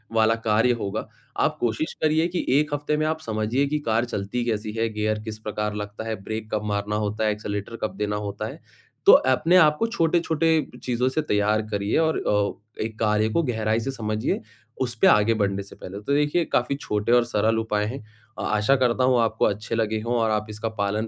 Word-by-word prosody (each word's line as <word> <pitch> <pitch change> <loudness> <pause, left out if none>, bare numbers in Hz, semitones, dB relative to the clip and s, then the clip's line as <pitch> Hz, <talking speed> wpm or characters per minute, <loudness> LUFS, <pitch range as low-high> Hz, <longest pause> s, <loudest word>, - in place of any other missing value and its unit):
वाला 110 0 +4
कार्य 110 +3 +3
होगा। 105 +1 -3 0.3
आप - - +2
कोशिश 120 +6 -1
करिए 155 +2 +3
कि 175 0 -3
1 150 -1 -1
हफ्ते 145 +1 -1
में 155 - 0
आप 160 0 -1
समझिए 110 +4 0
कि 150 +2 -1
कार 115 +1 +2
चलती 120 +1 -3
कैसी 110 -2 -2
है? 115 0 0
गियर 105 0 -1
किस 110 -1 -6
प्रकार 105 -1 -3
लगता 105 +2 -6
है? 110 - -1
ब्रेक 110 +1 -5
कब 105 -1 0
मारना 105 0 -1
होता 105 +1 -1
है? 105 - +3
एक्सेलेरेटर 105 +1 -5
कब 110 - -2
देना 105 0 -1
होता 105 -1 -4
है? - - -9 0.5
तो - - +10
अपने 130 +7 +4
आप 150 -3 +6
को 230 - +2
छोटे-छोटे 165 -5 +1 0.2
चीज़ों 125 +1 +1
से 155 +4 0
तैयार 105 -4 +1
करिए 100 0 0
और 160 -1 +2
अ, 105 +1 -2
एक 110 -1 -7
कार्य 110 0 +2
को 165 +10 +1
गहराई 110 -4 0
से 135 - -2
समझिए, 110 -3 -2 0.4
उस 120 -2 -1
पे - - +7
आगे 105 +2 +5
बढ़ने 100 -2 0
से 100 - -14
पहले। 100 +2 -8
तो 140 +7 -1
देखिए 150 +4 +2
काफ़ी 125 +3 +2
छोटे 105 -5 -2
और 120 -1 +6
सरल 110 -1 +1
उपाय 105 -2 0
हैं 130 +4 -5 0.4
अ, - - -3
आशा 105 +6 +2
करता 125 -1 +2
हूँ 130 - +4
वो 125 - +3
आपको 115 -1 +2
अच्छे 105 +3 -1
लगे 110 -1 0
हों 120 +1 0
और 115 -1 +2
आप 105 0 0
इसका 110 +2 -3
पालन 105 +2 0
110 Hz, 215 wpm, -24 LUFS, 105-130 Hz, 0.5 s, तो